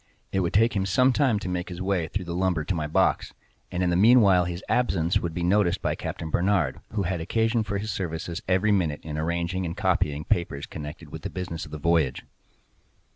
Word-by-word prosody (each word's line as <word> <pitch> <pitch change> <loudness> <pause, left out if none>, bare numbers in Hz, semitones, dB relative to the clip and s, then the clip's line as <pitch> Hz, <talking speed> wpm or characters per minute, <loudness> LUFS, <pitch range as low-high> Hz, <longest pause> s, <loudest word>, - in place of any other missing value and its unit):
It 95 - +1
would 85 -3 0
take 115 +2 +4
him 95 -1 0
some 125 +7 +4
time 130 -5 +2
to 100 - -5
make 90 0 -3
his 90 -1 -7
way 95 -3 0
through 95 +2 -4
the 85 - -4
lumber 90 -3 0
to 95 - -2
my 80 -3 -2
box, 75 - +1 0.4
and 90 +1 -1
in 90 - +2
the - - +2
meanwhile 100 -3 +6
his 85 +2 -5
absence 90 -9 +1
would 85 - -3
be 90 - -2
noticed 90 0 +2
by - - -1
Captain 80 -1 -5
Barnard, 90 -7 +1
who 105 -2 0
had 90 -1 -2
occasion 115 +6 +1
for 105 -2 -2
his 105 +2 -3
services 85 -2 -4
every 95 +3 +2
minute, 85 -7 +1
in 75 -1 -5
arranging 85 +3 -1
and 85 +1 -4
copying 80 -6 0
papers 75 -6 -1
connected 75 -1 -8
with - - -7
the - - -4
business 90 -3 -5
of - - -15
the 75 - -5
voyage. 80 -3 +1
90 Hz, 220 wpm, -26 LUFS, 85-100 Hz, 0.4 s, meanwhile